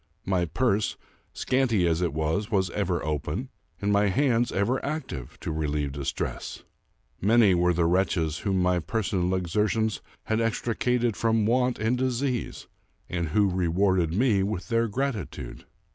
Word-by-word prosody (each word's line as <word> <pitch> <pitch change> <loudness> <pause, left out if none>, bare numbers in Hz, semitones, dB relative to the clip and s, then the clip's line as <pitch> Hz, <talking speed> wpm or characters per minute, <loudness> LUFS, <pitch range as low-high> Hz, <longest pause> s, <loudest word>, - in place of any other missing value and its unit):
My 90 -2 +1
purse, 105 - 0 0.3
scanty 125 -8 +1
as 85 +1 +1
it 85 - +1
was, 80 +7 -1
was 95 -5 +1
ever - - -1
open, 75 -2 -3 0.3
and 100 0 0
my 100 0 +4
hands 120 +2 +2
ever 120 +7 0
active, 140 - -5
to - - -3
relieve 75 -2 -1
distress. 70 0 -4 0.6
Many 105 -1 +5
were 90 0 +3
the 85 -1 +1
wretches 85 -3 +1
whom 95 -2 0
my 90 0 +2
personal 95 0 -1
exertions 105 +4 0 0.2
had 110 +1 0
extricated 120 0 0
from 115 -2 +1
want 125 +2 +2
and 115 +3 0
disease, 130 -1 -2 0.5
and 85 -2 -1
who 100 +7 +3
rewarded 90 -1 +1
me 105 +1 +2
with 95 -3 -3
their 115 0 +2
gratitude. 120 - -4
100 Hz, 145 wpm, -26 LUFS, 85-115 Hz, 0.6 s, Many